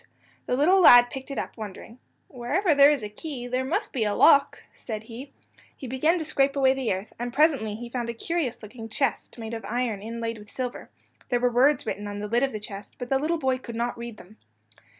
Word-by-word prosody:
The 250 - +1
little 365 +7 +4
lad 245 -6 +8
picked 265 +1 -7
it 275 - -5
up, - - -4
wondering. 220 +3 -9 0.3
"Wherever 295 - 0
there 285 0 +7
is 290 -6 0
a - - -3
key, 245 +4 -7
there 255 +1 -1
must 265 +6 -2
be 245 - 0
a 210 -1 0
lock," 280 - +5
he - - -20
said. 215 -2 -5
He 240 +5 -9 0.5
began 265 +7 +1
to 320 - -2
scrape 275 -2 +1
away 265 -1 +4
the 265 -4 -2
earth, 190 +3 -4
and 240 0 -3
presently 275 -8 +2
he 240 +2 -7
found 240 -2 -3
a 235 - -4
curious 275 -3 -3
looking 225 +1 -9
chest 275 +3 -2
made 225 0 -6
of 225 - -5
iron 225 -1 -2
inlaid 230 +1 -5
with 210 0 -13
silver. 250 -2 -5 0.4
There 245 - +1
were 245 0 +2
words 260 +4 +3
written 205 -1 -4
on 205 0 -5
the 210 +1 -4
lid 235 +3 +1
of 275 -1 +1
the 215 - -5
chest, 205 -1 -9
but 245 -1 -7
the 270 - +3
little 325 +4 0
boy 260 -4 0
could 235 -2 -8
not 235 +1 -2
read 235 -2 -8
them. 210 +5 -16
245 Hz, 230 wpm, -26 LUFS, 225-275 Hz, 0.5 s, lad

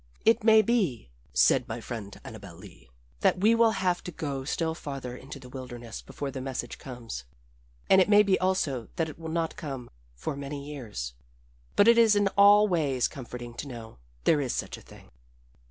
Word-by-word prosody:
"It 225 -1 +4
may 220 -1 +7
be," 185 - 0 0.2
said 65 -1 +4
my 115 +1 -4
friend 110 -4 -7
Annabel - - -10
Lee, 60 0 -15 0.3
"that - - +3
we 215 +4 +5
will 230 -1 +4
have 185 -3 0
to 180 - -4
go 140 -4 -4
still 160 +3 -1
farther 135 -6 -6
into 135 +3 -9
the 130 - -12
wilderness 120 -3 -8
before 140 -1 -6
the 130 - -5
message 130 -2 -5
comes, 120 - -7 0.6
and 190 - +6
it 185 - +2
may 210 0 +7
be 195 -2 +2
also 155 - 0
that 165 -3 -1
it 155 - -11
will 165 -1 -6
not 165 0 -1
come 135 -6 -7 0.2
for - - -4
many 140 0 -6
years. 110 - -6 0.6
"But 205 - +5
it 235 0 +7
is 225 -2 +6
in 205 -1 +3
all 205 +2 +6
ways 145 - +1
comforting 120 -2 -8
to - - -5
know 115 - -9 0.2
there 150 -3 +4
is 130 -3 -2
such - - -3
a - - -13
thing." - - -16
140 Hz, 190 wpm, -28 LUFS, 125-190 Hz, 0.6 s, may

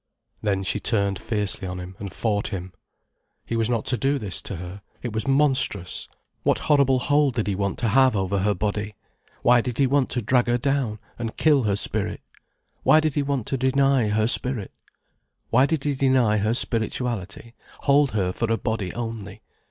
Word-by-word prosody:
Then 100 -2 0
she 100 - -1
turned 100 -4 0
fiercely 105 -3 -2
on 90 0 -5
him, 90 +1 -8
and 100 -2 -6
fought 105 +4 -1
him. 95 -3 -6 0.7
He 115 - -3
was 115 0 0
not 115 -1 0
to 130 -2 -1
do 140 +1 +1
this 105 -7 -4
to 100 - -6
her, 90 +3 -8 0.2
it 120 -3 -4
was 110 +4 -2
monstrous. 135 -10 +1 0.3
What - - +2
horrible 140 -3 +3
hold 145 0 +2
did 110 - 0
he 100 - -1
want 100 0 -2
to 115 - 0
have 130 +1 +4
over 95 0 0
her 105 +2 +1
body? 105 +2 -3 0.5
Why 120 0 +5
did 125 -1 -4
he 140 - +4
want 135 0 +2
to 125 - -2
drag 120 +3 +2
her 120 0 +2
down, 135 -4 -1 0.2
and 115 -1 -4
kill 145 -6 +3
her 100 -2 +2
spirit? - - -3 0.6
Why 155 - +5
did 155 -2 0
he 145 - +1
want 140 -5 -1
to 135 - -2
deny 130 -1 +2
her 110 +1 +2
spirit? 120 -2 +1 0.8
Why 130 +4 +5
did 160 -3 -1
he 145 - 0
deny 130 -5 +3
her 105 +3 +1
spirituality, 115 -2 -2 0.3
hold 140 -2 +3
her 95 -4 0
for 115 +2 -1
a 115 - +2
body 110 -6 -2
only? 115 -4 -6
115 Hz, 190 wpm, -24 LUFS, 100-135 Hz, 0.8 s, Why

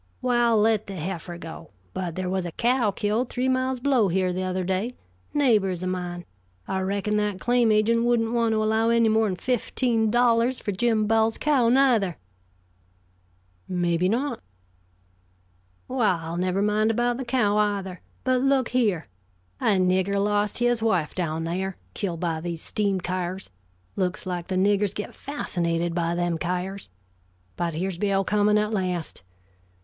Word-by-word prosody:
"Well, 240 -2 +2
let 215 0 +2
the 195 - -6
heifer 175 0 -5
go. 165 -1 -9 0.2
But 175 -3 -4
there 185 0 -3
was 185 0 -1
a - - -5
cow 240 -2 +2
killed 210 +5 -1
three 255 +1 -1
miles 260 0 0
below 250 -5 +3
here 185 0 0
the 185 - -2
other 185 0 -2
day. 190 +7 -2 0.4
Neighbors 210 -11 +2
of 185 - -1
mine. 175 -1 -4 0.4
I 190 - -1
reckon 200 +2 -1
that 210 -2 -1
claim 240 0 +3
agent 225 +2 +3
wouldn't 235 -2 +2
want 230 -1 +2
to 215 0 +1
allow 220 +1 +2
any 230 -1 +4
more 220 0 +3
than 190 - -1
fifteen 235 +1 0
dollars 240 +1 +3
for 205 - -3
Jim 220 +2 +1
Bowles' 225 +1 +2
cow, 275 -6 +2
neither." 235 - +3 1.5
"Maybe 175 0 +1
not." 265 +7 -1 1.5
"Well, 180 -10 0
never 185 +2 0
mind 210 +1 +2
about 240 +1 +1
the 265 - -3
cow, 235 -4 +1
either; 200 -4 -1 0.2
but 255 -1 +2
look 270 -2 +2
here. 215 -10 +1 0.5
A 205 - +2
nigger 185 +2 +2
lost 205 0 +1
his 240 -1 +1
wife 185 -9 +1
down 165 -3 -2
there, 185 +3 -3 0.2
killed 175 -5 -3
by 165 -3 -1
these 170 -1 -5
steam 200 -3 0
kyars 185 - -4 0.4
looks 185 -2 -2
like 180 -2 -4
the 190 - -2
niggers 200 +1 +2
get 210 - -5
fascinated 170 - -2
by 170 0 0
them 175 -1 -1
kyars. 180 +3 -3 0.7
But 170 -2 -2
here's 180 +1 -3
Bill 195 -1 +1
coming 210 +1 +2
at 210 +1 0
last. 180 - -2
205 Hz, 160 wpm, -25 LUFS, 180-230 Hz, 1.5 s, any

